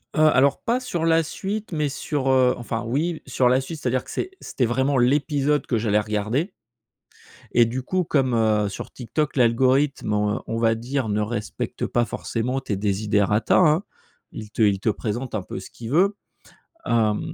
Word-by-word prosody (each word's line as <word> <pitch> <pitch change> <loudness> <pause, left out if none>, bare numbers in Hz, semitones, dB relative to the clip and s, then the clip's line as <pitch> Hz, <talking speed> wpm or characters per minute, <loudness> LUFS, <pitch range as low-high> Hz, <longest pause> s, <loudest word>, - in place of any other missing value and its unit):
Heu, - - 0
alors, 135 +2 +3
pas 240 +2 +1
sur 175 -10 -3
la 165 0 +4
suite, 205 +6 -5
mais 150 -2 0
sur, 135 0 -2
heu, 130 -1 +4
enfin, 115 -1 -4
oui, 155 +8 -1
sur 125 -1 +2
la 130 +1 +4
suite, 155 +4 -7
c'est-à-dire 130 0 0
que - - -15
c'est 370 - -3
c'était 125 - -1
vraiment 130 +4 +1
l'épisode 145 +3 +2
que 120 - +1
j'allais 105 -1 +2
regarder 110 - -1 1.0
et 120 -1 +5
du 125 +3 -3
coup 185 +5 0
comme, 135 -5 +1
heu, 110 -2 +2
sur 100 - -7
TikTok, 140 +5 -3
l'algorithme, 130 0 +2
on 105 0 0
on 115 - -2
va 115 -1 +2
dire, 125 +1 -3
ne 105 +1 0
respecte 105 0 -3
pas 120 -1 +1
forcément 120 +4 -3
tes 110 -6 -3
desiderata 105 +1 +1
hein, 165 +1 +4 0.5
il 110 -1 -8
te 115 - -3
il 100 -2 +3
te 110 - 0
présente 115 +3 -3
un 105 - -1
peu 95 - -6
ce - - -10
qu'il 115 -1 -8
veut. 195 +7 +3 0.7
Hem, 110 -3 +2
125 Hz, 185 wpm, -23 LUFS, 110-145 Hz, 1.0 s, et